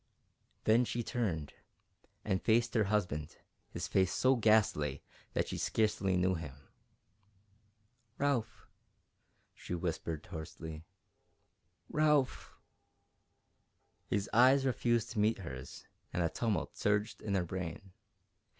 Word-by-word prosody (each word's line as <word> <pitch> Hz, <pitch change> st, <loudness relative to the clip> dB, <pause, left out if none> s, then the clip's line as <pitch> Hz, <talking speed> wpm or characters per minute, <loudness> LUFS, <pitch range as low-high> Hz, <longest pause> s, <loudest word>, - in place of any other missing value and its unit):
Then 115 Hz, +3 st, +5 dB
she 120 Hz, 0 st, -2 dB
turned 95 Hz, -, -2 dB, 0.7 s
and 95 Hz, -3 st, 0 dB
faced 115 Hz, +1 st, +2 dB
her 110 Hz, -3 st, +3 dB
husband, 90 Hz, -8 st, -1 dB, 0.3 s
his -, -, -4 dB
face 95 Hz, -2 st, +2 dB
so 130 Hz, +1 st, +3 dB
ghastly 105 Hz, -, +2 dB, 0.3 s
that -, -, 0 dB
she -, -, -4 dB
scarcely 100 Hz, -4 st, +1 dB
knew 90 Hz, +1 st, +2 dB
him. 80 Hz, -6 st, -6 dB, 1.6 s
"Ralph!" 135 Hz, -6 st, -1 dB, 0.9 s
she 90 Hz, -, -5 dB
whispered, 80 Hz, -2 st, -3 dB
hoarsely. 80 Hz, 0 st, -7 dB, 1.0 s
"Ralph!" 150 Hz, -3 st, +1 dB, 1.5 s
His 100 Hz, 0 st, 0 dB
eyes 130 Hz, +4 st, +6 dB
refused 120 Hz, -3 st, +1 dB
to 110 Hz, -, -3 dB
meet 110 Hz, +2 st, +3 dB
hers, 65 Hz, -7 st, -8 dB, 0.3 s
and 90 Hz, -, 0 dB
a 85 Hz, -, +1 dB
tumult 110 Hz, +4 st, -1 dB
surged 105 Hz, +2 st, 0 dB
in 100 Hz, -2 st, -1 dB
her 90 Hz, -2 st, +1 dB
brain. 90 Hz, +2 st, -5 dB
100 Hz, 110 wpm, -33 LUFS, 85-115 Hz, 1.6 s, eyes